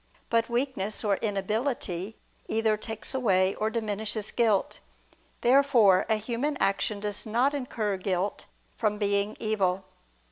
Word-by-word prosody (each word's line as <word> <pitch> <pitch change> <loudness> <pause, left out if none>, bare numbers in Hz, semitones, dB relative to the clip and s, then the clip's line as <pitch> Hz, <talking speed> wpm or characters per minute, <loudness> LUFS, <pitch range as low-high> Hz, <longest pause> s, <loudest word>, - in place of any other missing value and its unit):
But 230 0 +2
weakness 235 -5 -2
or 200 -2 +2
inability 210 -1 -2 0.3
either 220 -1 +2
takes 220 +2 -6
away 195 -7 +2
or 215 - -1
diminishes 215 -1 -3
guilt. 220 -5 +1 0.6
Therefore 245 -7 +5
a 220 - +4
human 240 +7 -2
action 200 +1 +1
does 205 0 -3
not 240 +6 +1
incur 225 -7 -2
guilt 185 +1 -2 0.3
from 210 -2 0
being 200 0 0
evil. 195 -3 0
215 Hz, 120 wpm, -28 LUFS, 200-235 Hz, 0.6 s, Therefore